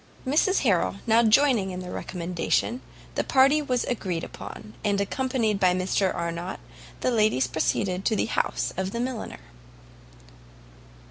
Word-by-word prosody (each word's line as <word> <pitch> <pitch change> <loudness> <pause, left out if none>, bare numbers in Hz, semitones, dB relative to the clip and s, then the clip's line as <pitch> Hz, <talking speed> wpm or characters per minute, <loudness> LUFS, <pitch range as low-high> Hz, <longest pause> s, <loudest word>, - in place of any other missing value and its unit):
Mrs 315 +9 +2
Harrel 200 -7 +2
now 230 0 +5
joining 230 -3 +4
in 185 0 -5
the 180 - -7
recommendation, 180 +7 -2 0.3
the - - 0
party 275 +3 +4
was 250 -4 0
agreed 185 -9 -2
upon, 105 +2 -9
and 205 -1 +1
accompanied 225 -1 0
by 180 -2 +4
Mr 185 +1 +1
Arnott, 170 +1 -4 0.4
the 255 - +1
ladies 215 - +3
proceeded 180 - -1
to 220 - +2
the - - +1
house - - -1
of 190 +1 -2
the 235 - -2
milliner. 245 -2 -4
205 Hz, 140 wpm, -26 LUFS, 180-250 Hz, 0.4 s, now